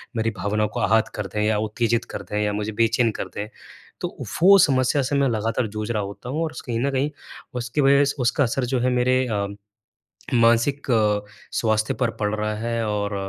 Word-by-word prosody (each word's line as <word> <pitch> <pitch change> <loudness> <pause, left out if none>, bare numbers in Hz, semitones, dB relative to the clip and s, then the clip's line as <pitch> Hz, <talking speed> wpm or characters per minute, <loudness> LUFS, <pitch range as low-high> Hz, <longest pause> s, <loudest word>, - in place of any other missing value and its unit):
मेरी 115 0 +1
भावनाओं 105 +3 0
को - - -5
आहत 110 0 +3
कर 105 -2 -3
दें 105 +4 -3
या 105 0 +2
उत्तेजित 115 +2 0
कर - - -5
दें 105 - -2
या 105 -1 0
मुझे 105 +1 -2
बेचैन 115 +2 +2
कर - - -3
दें। 105 - -4 0.5
तो - - -1 0.3
वो 195 +3 +8
समस्या 135 -1 +3
से 140 +2 -1
मैं 140 - +3
लगातार 115 +1 -1
जूझ 110 +1 -5
रहा 110 -3 0
होता 100 +5 -8
हूँ, 155 +5 -1
और 160 - -2
उस - - -8
कहीं 115 -2 -3
न 140 +3 0
कहीं 135 +2 0 0.4
उसकी 125 +4 -1
वज़ह 140 0 +4
उसका 125 +4 +2
असर 125 +1 0
जो 125 0 0
है 125 - +1
मेरे 125 +1 +2
अ, 100 -3 -1 0.9
मानसिक 120 +4 +3 0.7
स्वास्थ्य 110 -1 +1
पर 115 - +2
पड़ 105 -1 -1
रहा 105 0 -2
है, 115 +1 -2
और 105 -1 -1
115 Hz, 205 wpm, -23 LUFS, 105-130 Hz, 0.9 s, वो